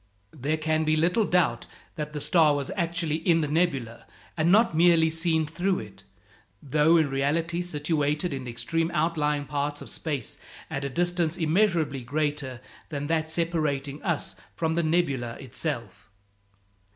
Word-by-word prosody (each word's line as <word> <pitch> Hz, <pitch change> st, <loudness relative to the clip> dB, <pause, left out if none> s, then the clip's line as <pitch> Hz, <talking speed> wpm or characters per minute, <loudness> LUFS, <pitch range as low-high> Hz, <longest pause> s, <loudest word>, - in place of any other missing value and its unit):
There 150 Hz, +2 st, -1 dB
can 155 Hz, 0 st, 0 dB
be 155 Hz, 0 st, +2 dB
little 180 Hz, +8 st, +2 dB
doubt 170 Hz, -12 st, +1 dB, 0.3 s
that 150 Hz, -2 st, -5 dB
the 150 Hz, -, -4 dB
star 155 Hz, -1 st, +4 dB
was 140 Hz, -1 st, -3 dB
actually 165 Hz, -3 st, 0 dB
in 165 Hz, 0 st, +2 dB
the 150 Hz, -, 0 dB
nebula, 140 Hz, -7 st, -1 dB, 0.3 s
and 160 Hz, +3 st, +2 dB
not 215 Hz, -3 st, +4 dB
merely 165 Hz, -1 st, +5 dB
seen 160 Hz, -1 st, +1 dB
through 180 Hz, +5 st, -1 dB
it, 100 Hz, -1 st, -9 dB, 0.6 s
though 150 Hz, +6 st, +3 dB
in 160 Hz, -2 st, +3 dB
reality 160 Hz, +6 st, 0 dB
situated 150 Hz, -1 st, -1 dB
in 130 Hz, -2 st, -5 dB
the -, -, -5 dB
extreme 165 Hz, +7 st, -1 dB
outlying 150 Hz, -2 st, +1 dB
part 145 Hz, 0 st, -2 dB
of -, -, -8 dB
space 145 Hz, -8 st, -3 dB, 0.3 s
at 135 Hz, -, -3 dB
a 140 Hz, -, -2 dB
distance 175 Hz, +2 st, 0 dB
immeasurably 165 Hz, -5 st, +1 dB
greater 145 Hz, -2 st, -2 dB, 0.3 s
than 145 Hz, -2 st, -3 dB
that 160 Hz, 0 st, 0 dB
separating 155 Hz, -4 st, -1 dB
us 170 Hz, -5 st, -2 dB, 0.2 s
from 160 Hz, -1 st, 0 dB
the 170 Hz, -, +1 dB
nebula 155 Hz, -8 st, 0 dB
itself. 125 Hz, -, -5 dB
155 Hz, 150 wpm, -26 LUFS, 145-170 Hz, 0.6 s, merely